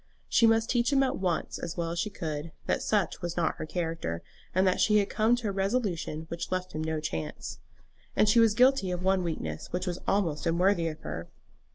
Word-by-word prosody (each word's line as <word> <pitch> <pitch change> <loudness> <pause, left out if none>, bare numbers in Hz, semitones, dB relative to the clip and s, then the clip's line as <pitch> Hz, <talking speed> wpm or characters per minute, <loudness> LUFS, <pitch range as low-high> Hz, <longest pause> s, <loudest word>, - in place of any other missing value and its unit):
She 230 - +5
must 225 +1 +3
teach 240 +2 +2
him 275 -1 +4
at 265 - 0
once, 180 -4 -1
as 170 +1 -5
well 165 -1 -1
as 170 - -3
she 210 - 0
could, 160 -4 -5
that - - 0
such 205 -4 0
was 175 -1 -4
not 170 - +1
her 155 - -5
character, 165 - -3 0.3
and 185 +1 +2
that 185 - +2
she 210 -1 +5
had 200 -1 +1
come 220 +3 +3
to 240 -4 -3
a - - 0
resolution 195 -6 -1
which 170 +2 -5
left 185 0 -2
him 155 - -2
no 160 0 -1
chance. 80 - -5 0.6
And 210 - +4
she 215 +3 +5
was 225 -2 +5
guilty 255 -4 +4
of 180 0 -3
one 190 0 +3
weakness 80 - -4
which 180 +1 -2
was 180 -1 -3
almost 170 -6 +1
unworthy 170 +1 +3
of 155 -1 -5
her. 80 +2 -6
180 Hz, 220 wpm, -29 LUFS, 160-210 Hz, 0.6 s, She